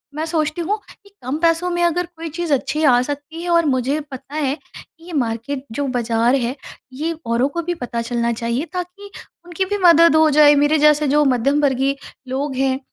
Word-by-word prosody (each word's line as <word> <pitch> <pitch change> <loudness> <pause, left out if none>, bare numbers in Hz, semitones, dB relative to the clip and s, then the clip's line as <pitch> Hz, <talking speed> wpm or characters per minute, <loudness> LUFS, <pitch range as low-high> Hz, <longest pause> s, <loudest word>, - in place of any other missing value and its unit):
मैं 310 +1 -2
सोचती 320 0 -1
हूँ 405 +6 -1 0.3
कि 400 - -19
कम 260 +4 -2
पैसों 335 +1 +2
में 345 0 -1
अगर 345 +1 +1
कोई 330 0 -6
चीज़ 330 0 -2
अच्छी 300 +3 -1
आ 245 -3 +5
सकती 290 +5 -6
है 350 - -4
और 335 -1 +3
मुझे 270 +1 0
पता 270 +2 -9
है 285 -3 0 0.2
कि 330 0 -15
ये 350 - -9
मार्केट 260 +1 -2
जो 280 +5 -2
बाज़ार 235 +1 +1
है, 250 -1 -1 0.4
ये 310 +5 -2
औरों 235 +3 +1
को 340 +4 -3
भी 350 +2 -2
पता 240 -6 -4
चलना 235 0 -1
चाहिए, 235 +5 -2
ताकि 365 +3 -6 0.4
उनकी 350 +2 -2
भी 410 +2 -2
मदद 335 -2 +6
हो 315 0 +5
जाए। 295 0 +6
मेरे 290 +2 +3
जैसे 300 0 +4
जो 295 +2 +3
मध्यम 275 +3 +2
वर्गीय 270 -1 +1 0.3
लोग 270 +1 -3
हैं, 265 0 0
290 Hz, 205 wpm, -19 LUFS, 260-330 Hz, 0.4 s, मदद